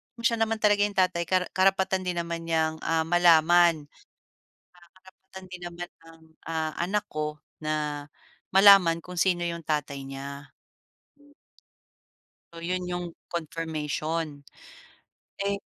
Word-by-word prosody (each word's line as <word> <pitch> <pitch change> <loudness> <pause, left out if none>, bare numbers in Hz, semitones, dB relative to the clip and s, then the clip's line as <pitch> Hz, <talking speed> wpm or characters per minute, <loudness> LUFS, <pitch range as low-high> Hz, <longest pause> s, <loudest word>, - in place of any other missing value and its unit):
kung 235 0 -7
siya 230 - 0
naman 225 0 -1
talaga 205 -1 +4
yung 205 - -4
tatay 185 -2 +2
ka 185 0 +1
karapatan 190 0 +2
din 180 -1 -2
naman 170 0 -4
niyang, 160 -1 +1
um, 160 -1 +1
malaman. 170 -2 +5 0.9
At 175 -1 -20
karapatan 190 0 -15
din 180 -1 -8
naman 175 0 -6 0.2
ng, 165 0 -16 0.3
ah. 160 -1 -2
anak 200 +4 0
ko 150 0 -3 0.2
na 150 -1 -2 0.5
malaman 195 -4 +7
kung 180 0 -9
sino 180 -2 +2
yung 170 0 -4
tatay 145 -2 -2
niya. 140 +1 -8 2.0
So 165 - -9
'yon 180 +2 -2
'yong 175 -1 -4 0.2
confirmation. 160 -2 -3 1.0
Eh. 200 0 +1
170 Hz, 125 wpm, -27 LUFS, 155-185 Hz, 2.0 s, malaman